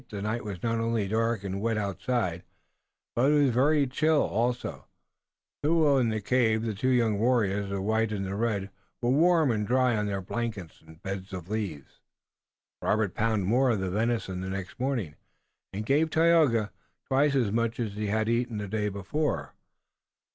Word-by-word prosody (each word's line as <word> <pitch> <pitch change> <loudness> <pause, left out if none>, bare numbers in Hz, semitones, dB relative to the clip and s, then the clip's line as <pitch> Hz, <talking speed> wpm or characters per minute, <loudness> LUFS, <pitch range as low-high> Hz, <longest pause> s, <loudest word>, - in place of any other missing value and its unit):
The 105 - -6
night 110 +3 -2
was 100 -5 -7
not 115 -1 0
only 115 -3 0
dark 115 0 0
and 100 0 -4
wet 115 0 0
outside, 100 -2 -1 0.7
but 130 +5 +3
it - - +4
was 140 -2 +4
very 145 +4 +3
chill 155 +4 +2
also, 120 +3 -2 0.7
though 150 -3 +3
in 120 -3 +2
the 110 -1 -1
cave 110 0 +1
the 115 -2 -2
two 120 +6 -1
young 115 -5 +2
warriors, 105 -4 +1
the 100 -1 -3
white 110 +1 +1
and 100 -2 -2
the 95 - -4
red, 100 -2 -1 0.3
were 120 0 +1
warm 160 0 +4
and 105 -2 -1
dry 125 -1 +3
on 105 -1 -1
their 100 -1 -2
blankets 100 -3 -5
and 80 0 -17
beds 95 0 -5
of 90 +1 -7
leaves. 95 -11 -4 0.8
Robert 105 -4 +1
pounded 110 -4 0
more 125 +5 +3
of 110 -4 +1
the 95 -1 -2
venison 110 -3 -1
the 95 - -4
next 95 +4 -6
morning 120 - -2 0.5
and 105 +2 -5
gave 150 +6 +2
Tayoga 155 - +3 0.3
twice 140 +2 +2
as 120 -7 +2
much 115 +1 -1
as 110 -4 -2
he 105 +1 -3
had 110 +2 0
eaten 115 -1 0
the 105 -1 -4
day 105 +1 -1
before. 100 +10 -2
110 Hz, 180 wpm, -28 LUFS, 100-125 Hz, 0.8 s, it